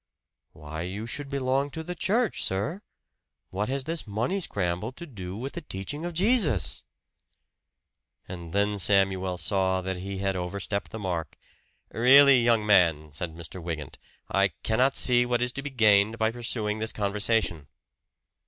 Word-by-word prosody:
"Why 75 +1 -7
you 95 +5 -5
should 140 +4 -4
belong 135 0 0
to 160 +3 -6
the 180 - -5
church, 205 +6 +1
sir? 105 - -2 0.7
What 105 +4 -2
has 135 0 -1
this 160 -2 -3
money 115 - -1
scramble 95 - -2
to 170 - -9
do 95 - -7
with 130 +5 -5
the - - -5
teaching 145 - -5
of 175 -1 -5
Jesus?" 180 - +2 1.4
And 85 -3 -8
then 100 +1 0
Samuel 95 -2 +2
saw 95 +2 +1
that 95 0 -3
he 95 +2 -5
had 95 0 -1
overstepped 100 +2 -3
the - - -7
mark. 90 -6 -4 0.5
"Really, 135 +2 +7
young 115 -2 +3
man," 85 -7 +3
said 80 +2 -5
Mr. 85 +2 -8
Wygant, 80 -4 -6 0.3
"I 100 0 +3 0.2
cannot 130 +5 +2
see 120 -1 +4
what 120 0 0
is 125 0 0
to 140 - -5
be 145 - -5
gained 110 -3 +4
by 110 0 +1
pursuing 115 -3 -2
this 110 +1 -1
conversation." 100 -6 0
105 Hz, 155 wpm, -27 LUFS, 95-130 Hz, 1.4 s, Really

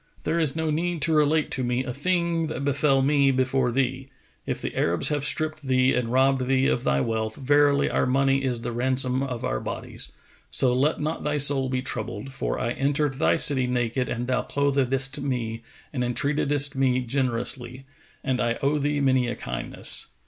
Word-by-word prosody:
There 170 - 0
is 155 -4 +1
no 160 -1 -1
need 170 +2 -1
to 165 - +1
relate 155 0 +2
to 130 - -2
me 125 +1 -1
a 125 -1 -5
thing 170 +2 0
that 140 -3 -4
befel 140 -1 +2
me 140 0 +3
before 130 -1 +1
thee. 130 +1 -2 0.4
If - - -2
the - - -5
Arabs 85 +1 +1
have 145 -2 -1
stripped 155 +1 0
thee 130 -1 +2
and 120 -2 -1
robbed 130 0 +2
thee 130 0 +2
of 120 - 0
thy 70 0 +1
wealth, 110 -1 -2
verily 145 +1 +3
our - - 0
money 135 +1 +2
is 125 -3 -2
the 120 - -4
ransom 130 +1 +1
of 125 -3 -4
our - - -1
bodies, - - -3 0.4
so 125 -2 +3
let 140 +5 +1
not 155 +2 -3
thy 150 0 -1
soul 140 -2 +3
be 130 0 -2
troubled; 110 0 -5
for 135 - -3
I 120 -2 -1
entered 140 +1 -1
thy 80 +1 +3
city 130 - +2
naked 125 0 -1
and 120 +1 -3
thou 125 0 0
clothedst 135 -1 -1
me 120 -5 -3 0.3
and 125 -3 -1
entreatedst 140 +3 +1
me 130 -1 +1
generously, 125 0 -2 0.4
and 130 -1 -1
I 120 -1 0
owe 145 +2 +1
thee 145 0 -1
many 130 -2 +2
a 120 - -3
kindness. - - +1
135 Hz, 190 wpm, -25 LUFS, 125-145 Hz, 0.4 s, me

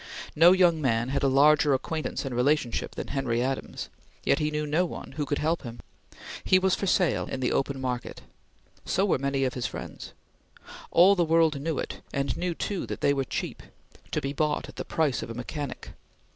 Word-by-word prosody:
No 165 +3 +7
young 175 -4 +4
man 120 -2 +1
had 140 - 0
a 140 - +3
larger 145 +1 +5
acquaintance 155 +2 -3
and 135 - -4
relationship 125 0 0
than - - -5
Henry 130 -4 -1
Adams, 135 +1 -3 0.4
yet - - +2
he 150 -1 +1
knew 150 0 -2
no 155 +4 +2
one 180 - -6
who 145 +1 -3
could 145 - 0
help 160 +2 0
him. 120 -3 -8 0.6
He 185 - +5
was 190 0 +2
for 200 - -1
sale, 180 -2 +2
in 135 - -4
the 125 - 0
open 135 0 -1
market. 125 -2 -4 0.6
So 195 - +1
were 185 - +1
many 140 0 0
of 130 -2 0
his 125 - -2
friends. - - -8 0.8
All 185 +4 +6
the 175 - +2
world 160 -3 +3
knew 160 -1 -2
it, - - -5
and 140 -1 -1
knew 175 -1 -2
too 200 0 -3
that - - -5
they 140 - +3
were 135 -1 -1
cheap; - - -4 0.5
to - - -1
be 135 +1 -3
bought 150 +1 0
at - - -13
the - - -4
price 155 -6 0
of - - -6
a 115 - -6
mechanic. 140 +3 -6
145 Hz, 205 wpm, -27 LUFS, 135-165 Hz, 0.8 s, No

